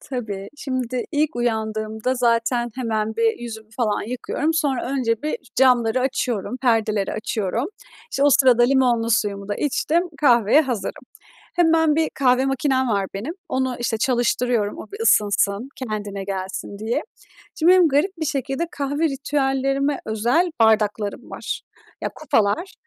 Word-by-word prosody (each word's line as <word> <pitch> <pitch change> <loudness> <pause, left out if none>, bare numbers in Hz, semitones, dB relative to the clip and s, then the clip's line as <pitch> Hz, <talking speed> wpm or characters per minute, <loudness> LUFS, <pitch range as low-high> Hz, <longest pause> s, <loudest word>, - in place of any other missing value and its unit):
Tabii, 210 -7 -5
şimdi 255 -3 -3
ilk 300 -3 0
uyandığımda 220 0 -1
zaten 240 0 +1
hemen 220 -3 -2
bir 230 0 +2
yüzümü 220 -2 -8
falan 215 -5 0
yıkıyorum. 255 +7 -2
Sonra 275 -5 0
önce 235 -4 0
bir 305 +9 -2 0.2
camları 250 -2 +3
açıyorum, 250 -3 -1
perdeleri 220 -5 +1
açıyorum. 215 +2 -2 0.4
İşte 275 - -1
o 290 - +5
sırada 255 -3 +5
limonlu 245 -3 +3
suyumu 205 -3 0
da 205 - -1
içtim, 305 +6 +1 0.2
kahveye 240 -1 +5
hazırım. 245 -7 -4 0.5
Hemen 325 -2 +4
bir 320 -1 +2
kahve 255 -1 +3
makinem 270 -1 +1
var 200 -3 +1
benim. 250 - -4
Onu 260 -1 -1
işte 225 -2 -1
çalıştırıyorum 240 -3 +1
o - - -8
bir 410 - -8
ısınsın, 205 - +2
kendine 205 -5 -4
gelsin 190 +1 -5
diye. 230 +8 -1 0.6
Şimdi 335 +3 +5
benim 365 -3 +6
garip 300 +7 +2
bir 315 - -2
şekilde 275 +2 -2
kahve 285 +3 -2
ritüellerime 275 0 0
özel 240 +11 +1
bardaklarım 215 -2 +1
var. - - -5 0.4
Ya - - -1
kupalar 225 - 0
245 Hz, 140 wpm, -22 LUFS, 220-275 Hz, 0.6 s, benim